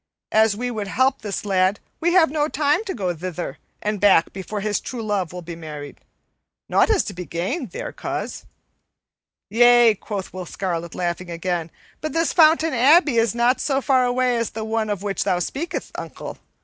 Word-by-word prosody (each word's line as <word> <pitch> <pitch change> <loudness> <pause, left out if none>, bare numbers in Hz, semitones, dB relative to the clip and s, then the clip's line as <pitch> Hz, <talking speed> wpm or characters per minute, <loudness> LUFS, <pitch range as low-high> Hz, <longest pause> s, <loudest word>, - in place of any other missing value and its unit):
An 220 +1 +5
we 245 +2 -2
would 215 -3 -4
help 260 +6 +1
this 205 0 -4
lad, 190 0 +2 0.2
we 345 +1 +1
have 330 -6 +5
no 300 -1 +1
time 295 +6 +1
to 385 - -4
go 185 -6 -1
thither 175 +1 -5 0.2
and 210 -1 -1
back 195 -5 +4
before 200 +2 -5
his 210 0 0
true 240 -3 -6
love 200 -5 -1
will 180 0 -7
be 170 0 -7
married. 150 -3 -9 0.7
Nought - - +3
is 430 -4 +3
to 200 - -6
be 180 0 -6
gained 195 - -3
there, - - -6
coz." - - -5 1.1
"Yea," 240 0 +6
quoth 200 -1 -6
Will 185 -1 -6
Scarlet, 170 -3 -4
laughing 175 0 -3
again, 170 -1 -2 0.3
"but 310 - -3
this 330 0 +1
Fountain 320 -1 +5
Abbey 280 +2 +5
is 225 -1 +1
not 240 +2 +2
so 270 -2 +1
far 265 -2 +3
away 250 0 +1
as 230 -1 -1
the 220 0 -5
one 220 -1 -1
of 205 -2 -3
which 200 -1 -1
thou 180 - +1
speakest, 280 - -4
uncle. - - -7
215 Hz, 190 wpm, -22 LUFS, 185-260 Hz, 1.1 s, Yea